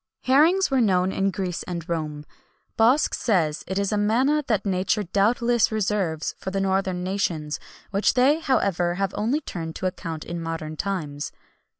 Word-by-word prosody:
Herrings 315 +8 +4
were 265 - +3
unknown 190 -5 +3
in 195 0 +1
Greece 185 -3 -3
and 170 -2 -5
Rome. 150 -3 -3 0.5
Bosc 245 +7 +4
says 165 -9 +1
it 190 - -3
is 200 -1 0
a 210 - +1
manna 260 +9 +2
that 215 -4 0
nature 195 +2 +1
doubtless 230 +5 +2
reserved 195 -7 -1
for - - -4
the 195 +1 -2
northern 190 -2 0
nations, 170 -6 -2 0.3
which 200 +1 +2
they, 270 +5 +4
however, 195 - +1
have 195 0 -1
only 240 +9 0
turned 165 - -6
to - - -5
account 165 -3 -4
in 170 0 -5
modern 160 -1 -4
times. 155 -6 -3
195 Hz, 165 wpm, -24 LUFS, 170-225 Hz, 0.5 s, Herrings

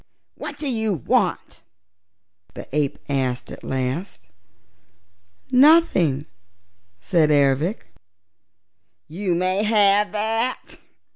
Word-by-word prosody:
"What - - -8
do 300 - -4
you 220 -5 -1
want?" 155 - -1 0.9
the - - -9
ape 145 -2 0
asked 130 -3 -2
at - - -10
last. 130 - -4 1.2
"Nothing," 250 - +4 0.8
said 165 -5 +2
Ervic. 145 - +1 1.2
"You 180 +3 -2
may 185 +3 0
have 210 -1 +3
that!" 225 +4 -2
185 Hz, 85 wpm, -22 LUFS, 140-215 Hz, 1.2 s, Nothing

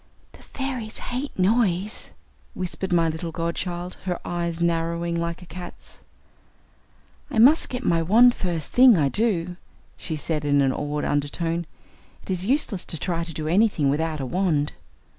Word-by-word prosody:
"The - - -17
fairies 255 -5 -5
hate 255 +4 -5
noise," 200 0 +1 0.5
whispered 185 +1 -4
my 170 -2 +3
little 160 +1 -3
godchild, 175 +2 -3
her 180 -2 -2
eyes 170 -1 -2
narrowing 170 0 0
like 170 +1 -3
a - - -11
cat's. 175 +1 -8 1.3
"I - - -4
must 270 +9 +6
get 250 0 -4
my 165 -1 +3
wand 230 +9 +6
first 170 -8 -3
thing 250 -4 +7
I 145 -3 +2
do," 180 - 0 0.4
she 160 - -4
said 150 0 -2
in 145 -1 +3
an 135 -1 +2
awed 145 0 -3
undertone. 165 +3 -1 0.6
"It - - -5
is 185 +1 -1
useless 245 -8 +1
to 165 - -3
try 170 0 -2
to 165 - -5
do 155 0 -4
anything 175 -6 +3
without 155 +1 -1
a 135 - -3
wand." 155 -1 0
170 Hz, 160 wpm, -24 LUFS, 165-195 Hz, 1.3 s, thing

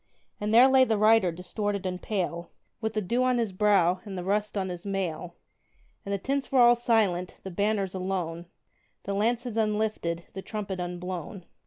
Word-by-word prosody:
And 210 +1 -2
there 240 +4 +8
lay 265 -1 +6
the 225 -4 +1
rider, 215 -3 +4
distorted 200 +3 -3
and 180 -1 -3
pale, 175 -4 -3 0.3
With 220 -1 -2
the 215 0 -1
dew 235 +7 0
on 255 -1 +2
his 230 -4 0
brow, 185 -2 +3
and 195 -2 -7
the 180 - -4
rust 210 +2 -1
on 190 -1 -1
his 175 -1 -6
mail; 180 -3 -3 0.7
And 200 - -6
the 200 - +1
tents 275 +7 -2
were 265 - +3
all 240 0 +8
silent, 220 -7 +1
the 190 - -6
banners 200 0 0
alone, 180 -3 -3 0.6
The 200 - -3
lances 230 +3 -1
unlifted, 210 -6 -1
the 190 - -6
trumpet 200 -3 -5
unblown. 180 0 -5
200 Hz, 180 wpm, -27 LUFS, 180-220 Hz, 0.7 s, there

